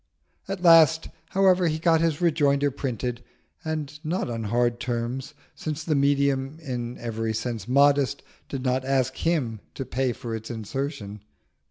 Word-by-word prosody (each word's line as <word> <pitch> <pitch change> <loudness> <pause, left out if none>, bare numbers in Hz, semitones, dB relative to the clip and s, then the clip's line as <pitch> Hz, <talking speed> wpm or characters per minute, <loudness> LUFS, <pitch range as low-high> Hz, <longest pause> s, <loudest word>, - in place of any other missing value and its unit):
At 195 -2 -4
last, 160 -2 +6 0.2
however, 185 -2 +4
he 155 -1 0
got 165 0 +3
his 165 -2 0
rejoinder 145 -4 +3
printed, 125 -3 -3 0.4
and 150 -2 -4
not 160 -5 -2
on 115 -1 -3
hard 120 +2 +1
terms, 120 +4 -3 0.2
since 155 0 -4
the 160 - 0
medium, 140 0 +1
in 125 -5 -5
every 115 -1 -3
sense 110 -2 -3
modest, 140 +1 +3 0.3
did 135 -2 -4
not 130 0 +1
ask 130 -1 +1
him 140 -10 0 0.2
to 135 - -4
pay 130 +1 0
for 115 -1 -6
its 110 0 -7
insertion. 110 -2 -5
135 Hz, 150 wpm, -25 LUFS, 120-155 Hz, 0.4 s, last